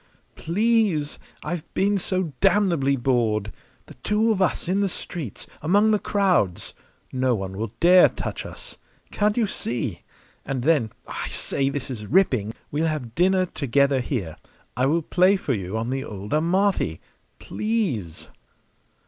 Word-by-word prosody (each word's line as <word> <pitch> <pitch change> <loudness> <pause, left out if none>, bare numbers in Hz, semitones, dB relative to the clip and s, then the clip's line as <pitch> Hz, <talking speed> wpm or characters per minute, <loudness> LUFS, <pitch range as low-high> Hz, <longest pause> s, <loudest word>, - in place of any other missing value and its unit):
"Please! 200 -5 +1 0.2
I've 175 -3 -5
been 200 +1 +2
so 185 -4 -2
damnably 170 -10 +3
bored. 115 -5 0 0.3
The - - -13
two 215 +2 +1
of 200 -3 0
us 185 - 0
in 190 +3 +1
the 200 - +1
streets, 160 - -6 0.2
among 205 +7 +3
the 210 - +3
crowds! 180 - +1 0.4
No 130 -1 +2
one 95 -2 -5
will 110 +1 -4
dare 180 +1 +7
touch - - -5
us. - - -8 0.3
Can't 210 +1 +1
you 235 - +3
see? 115 - -3 0.4
And 130 -3 -3
then 140 -8 +2 0.2
I - - -4
say, 135 0 0
this 140 -1 -3
is 105 -4 -6
ripping! 125 - +2 0.2
we'll 155 +3 0
have 145 -8 -3
dinner 185 +3 +3
together 140 -3 +1
here. 115 - -3 0.4
I 130 +2 +2
will 165 +3 +1
play 185 +5 +4
for 170 -8 -1
you 95 -1 -3
on 115 +2 -2
the 135 0 -2
old 105 -5 -6
Amati. 170 - +1 0.4
Please!" 180 - -2
150 Hz, 150 wpm, -24 LUFS, 120-190 Hz, 0.4 s, dare